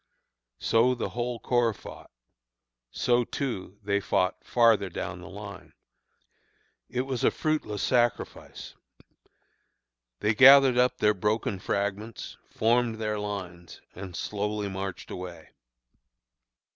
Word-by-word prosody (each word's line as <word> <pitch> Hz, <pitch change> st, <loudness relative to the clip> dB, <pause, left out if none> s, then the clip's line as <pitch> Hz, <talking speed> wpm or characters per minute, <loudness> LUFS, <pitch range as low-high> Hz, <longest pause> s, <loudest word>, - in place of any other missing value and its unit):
So 115 Hz, -, +2 dB
the 120 Hz, -, -3 dB
whole 120 Hz, 0 st, -3 dB
corps 120 Hz, -3 st, +1 dB
fought; -, -, -12 dB, 0.8 s
so, 120 Hz, -, +1 dB
too, 115 Hz, -8 st, -5 dB
they 100 Hz, 0 st, +1 dB
fought 95 Hz, 0 st, 0 dB
farther 115 Hz, -5 st, +3 dB
down -, -, -5 dB
the -, -, -10 dB
line. -, -, -10 dB, 1.2 s
"It 125 Hz, -, -1 dB
was 130 Hz, -2 st, -3 dB
fruitless 150 Hz, -10 st, 0 dB
sacrifice. 120 Hz, -2 st, -1 dB, 1.5 s
They 110 Hz, -, +1 dB
gathered 135 Hz, +1 st, +8 dB
up 125 Hz, 0 st, +3 dB
their 105 Hz, 0 st, +3 dB
broken 105 Hz, 0 st, -1 dB
fragments, 100 Hz, +4 st, -3 dB
formed 120 Hz, 0 st, +1 dB
their 105 Hz, -1 st, -2 dB
lines, 90 Hz, -5 st, -6 dB
and 95 Hz, -1 st, -8 dB
slowly 105 Hz, +1 st, -3 dB
marched 95 Hz, -1 st, -6 dB
away. 90 Hz, -3 st, -8 dB
105 Hz, 105 wpm, -27 LUFS, 100-120 Hz, 1.5 s, gathered